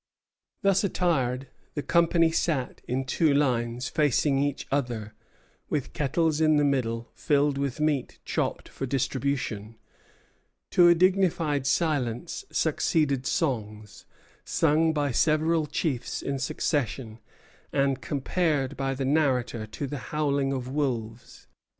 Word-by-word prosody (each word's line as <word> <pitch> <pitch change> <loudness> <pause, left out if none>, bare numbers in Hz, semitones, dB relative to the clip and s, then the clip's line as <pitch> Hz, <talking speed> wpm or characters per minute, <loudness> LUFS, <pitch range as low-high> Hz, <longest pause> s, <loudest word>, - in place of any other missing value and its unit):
Thus 195 0 +3
attired, 135 -9 0 0.3
the 145 - -2
company 170 -1 +3
sat 155 -6 -1
in 130 +2 -1
two 145 +2 +2
lines 125 -3 0
facing 145 -2 +2
each 145 0 -1
other, 120 -6 -2 0.6
with 145 -4 -2
kettles 155 +2 +1
in 155 -1 +4
the 145 - +3
middle 120 -5 -1
filled 145 -1 +1
with 140 -1 -2
meat 150 -4 0
chopped - - -2
for 135 - -5
distribution. 130 -5 -2 1.0
To 175 -1 +6
a 170 - +7
dignified 170 -6 +2
silence 135 -7 -1
succeeded 140 -5 +1
songs, 110 - -3 0.4
sung 160 +1 +2
by 145 -3 0
several 155 +4 +2
chiefs 135 -5 -2
in 140 -1 -2
succession, 125 -4 -2 0.5
and 140 -1 +1
compared 145 -1 -1
by 135 +1 -2
the 135 0 -2
narrator 130 -6 +1
to 110 +6 -5
the 140 0 -5
howling 140 -2 0
of 130 -2 -3
wolves. 125 -5 -3
140 Hz, 120 wpm, -27 LUFS, 125-155 Hz, 1.0 s, a